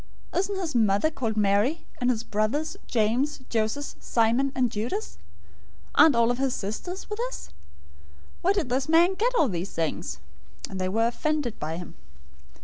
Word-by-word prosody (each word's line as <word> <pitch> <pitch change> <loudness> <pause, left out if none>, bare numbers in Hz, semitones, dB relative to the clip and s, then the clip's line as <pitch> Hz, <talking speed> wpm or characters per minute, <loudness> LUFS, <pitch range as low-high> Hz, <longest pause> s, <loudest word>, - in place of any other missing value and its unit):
Isn't 390 +2 0
his 345 -5 -3
mother 220 +5 +3
called 225 -7 -2
Mary, 210 +9 +2
and 245 - +2
his 235 -2 0
brothers, 220 +10 -1
James, 240 +6 +1
Joses, 225 +6 -1
Simon, 235 +4 +2
and 250 -3 +1
Judas{or, 215 +3 -2
Judah}? - - -1
013:056 80 - -5 0.8
Aren't 310 -5 +7
all 235 0 +4
of 245 - -2
his 270 -2 +1
sisters 285 - -5
with 420 +1 -5
us? - - -8 0.9
Where 375 - +3
then 385 - +2
did - - -11
this 265 +3 0
man 340 +3 +5
get 480 +6 0
all 320 - +5
of 245 - -1
these 180 +2 -3
things?" 160 - -2 0.5
013:057 190 - -6
They 185 0 0
were 225 +4 +2
offended 280 0 -1
by 160 +2 -3
him. 175 - -8
240 Hz, 180 wpm, -26 LUFS, 215-310 Hz, 0.9 s, Aren't